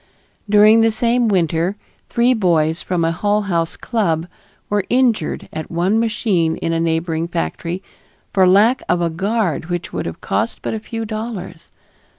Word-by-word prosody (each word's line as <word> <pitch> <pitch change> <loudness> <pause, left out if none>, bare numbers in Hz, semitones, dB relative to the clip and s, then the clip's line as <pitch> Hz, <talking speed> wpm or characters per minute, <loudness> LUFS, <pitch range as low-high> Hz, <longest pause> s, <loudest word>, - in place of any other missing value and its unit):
During 215 +2 +6
the 225 - +4
same 235 +2 +1
winter 175 -1 +1 0.3
three 240 +2 +3
boys 165 -7 +1
from 175 -3 -1
a 165 - +1
Hull 205 +5 0
House 170 -4 -1
club 170 -9 -1 0.4
were 205 -1 0
injured 240 -9 +1
at 155 - -5
one 180 +6 +1
machine 205 -8 0
in 165 - -2
a 165 - 0
neighboring 165 0 -1
factory 170 +1 -3 0.5
for 190 -2 +4
lack 210 +7 +4
of 175 - +2
a 170 -1 0
guard 190 -2 -1
which 175 -1 -4
would - - -3
have - - -6
cost - - -2
but - - -2
a 220 - -2
few 225 +1 -5
dollars. 215 -3 -6
190 Hz, 165 wpm, -19 LUFS, 165-220 Hz, 0.5 s, During